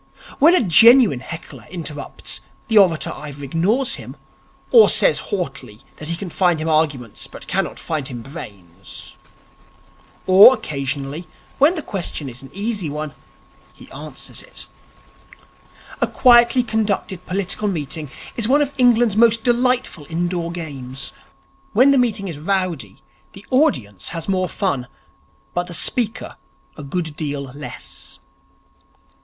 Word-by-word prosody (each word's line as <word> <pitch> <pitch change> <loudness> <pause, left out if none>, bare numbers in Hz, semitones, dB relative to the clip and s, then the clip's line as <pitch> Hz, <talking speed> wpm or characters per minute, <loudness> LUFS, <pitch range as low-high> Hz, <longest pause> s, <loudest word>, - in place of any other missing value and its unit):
When 330 +5 +7
a 360 - +3
genuine 225 - +6
heckler 165 +6 -9
interrupts, 155 -5 -6 0.3
the 220 -2 +6
orator 175 -5 +3
either 145 -1 -8
ignores 195 - 0
him, - - -10 0.6
or 455 -2 +8
says - - +4
haughtily 135 - -5 0.2
that 155 - -7
he 170 - 0
can 180 0 -6
find 175 -3 +2
him 155 - -3
arguments 150 -8 -1
but - - -10
cannot - - -2
find 155 -5 -3
him 120 -3 -7
brains. 100 - -11 1.1
Or, 195 +7 +9
occasionally, 145 - -4 0.3
when 300 +6 +5
the 315 - -4
question 170 - -4
is 120 0 -10
an 135 - -12
easy 205 -4 -3
one, 150 0 -5 0.6
he - - -15
answers - - -9
it. - - -11 1.4
A - - +3
quietly 240 0 +5
conducted 210 -5 -2
political 195 +2 -2
meeting 155 -4 -3 0.3
is 230 -3 0
one 285 +4 +4
of 285 0 -5
England's 240 -4 +4
most 225 0 +4
delightful 245 - 0
indoor 170 0 -2
games. 135 -6 -6 0.6
When 255 +6 +6
the 275 - +4
meeting 220 -5 0
is 160 -5 -6
rowdy, 160 - -2 0.3
the 195 - -13
audience 130 - +1
has 165 -2 -5
more 185 -2 0
fun, 140 -11 -2 0.7
but 175 0 -2
the 175 - -5
speaker 235 +4 0 0.4
a - - -9
good 155 +2 -4
deal 145 -3 -3
less. 145 +1 -7
175 Hz, 135 wpm, -20 LUFS, 145-225 Hz, 1.4 s, Or